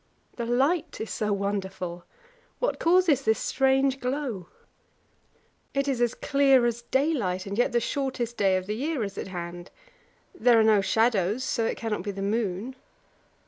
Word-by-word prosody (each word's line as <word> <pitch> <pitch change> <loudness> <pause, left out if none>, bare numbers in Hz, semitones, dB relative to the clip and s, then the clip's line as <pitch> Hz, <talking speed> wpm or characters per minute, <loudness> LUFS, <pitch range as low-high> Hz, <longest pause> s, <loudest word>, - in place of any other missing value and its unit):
The 235 -1 -4
light 275 +8 +1
is 220 - -5
so 210 -1 -1
wonderful; 190 -3 -3 0.5
what - - -1
causes 335 -5 +4
this 220 -4 +2
strange 270 0 +1
glow? 250 - -3 1.3
It 275 0 +1
is 240 -4 +1
clear 275 -3 +3
as 240 0 -1
daylight, 240 - 0
and 200 0 -4
yet 245 +4 +2
the 240 - +2
shortest 250 -3 -2
day 195 -3 +2
of 185 - -4
the 210 +2 -3
year 285 +1 -2
is 200 -1 -5
at - - -5
hand. 175 -1 -7 0.6
There 235 0 +4
are - - +5
no 215 -2 +5
shadows, 220 +1 +1
so 230 -3 0
it - - -3
cannot 225 -4 -3
be 205 - -5
the 195 0 -4
moon. 215 +3 -2
230 Hz, 160 wpm, -26 LUFS, 200-265 Hz, 1.3 s, are